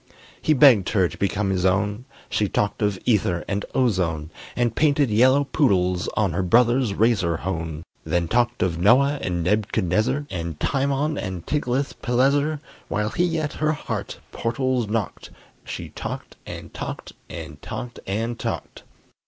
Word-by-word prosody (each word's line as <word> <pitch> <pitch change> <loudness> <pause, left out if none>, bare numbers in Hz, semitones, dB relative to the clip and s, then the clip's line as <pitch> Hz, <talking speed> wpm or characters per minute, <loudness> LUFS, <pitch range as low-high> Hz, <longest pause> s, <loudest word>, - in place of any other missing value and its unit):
He 155 - +3
begged 130 -9 +6
her 95 -4 +3
to - - -9
become 100 0 0
his 90 -2 0
own; 100 +5 +1 0.2
She 105 -2 0
talked 105 +1 -1
of 105 -2 +1
ether 95 -7 +1
and 100 +1 -1
ozone, 90 -11 0 0.2
And 120 -2 0
painted 145 -5 +3
yellow 130 +6 +5
poodles 90 - +1
on 100 -6 +2
Her 95 - 0
brother's 120 +3 +3
razor 95 -8 +2
hone; 80 -3 -4 0.2
Then 85 +2 0
talked 120 +4 +1
of 85 -3 -1
Noah 135 +9 +4
and 85 -2 -1
Neb'chadnezzar, 105 - +1
And 85 -4 -4
Timon 140 +2 0
and 95 -3 -5
Tiglath 140 -2 -1
pileser 140 +5 +2 0.3
While 105 0 -1
he 175 -2 +1
at 155 -1 -2
her 155 0 0
heart 150 - -5
portals 125 0 -1
knocked, 105 -2 -3 0.4
She - - -6
talked - - -6
and - - -8
talked - - -6 0.2
and - - -8
talked 120 -1 -6
and 115 +4 -2
talked! - - -4
110 Hz, 150 wpm, -23 LUFS, 95-130 Hz, 0.4 s, begged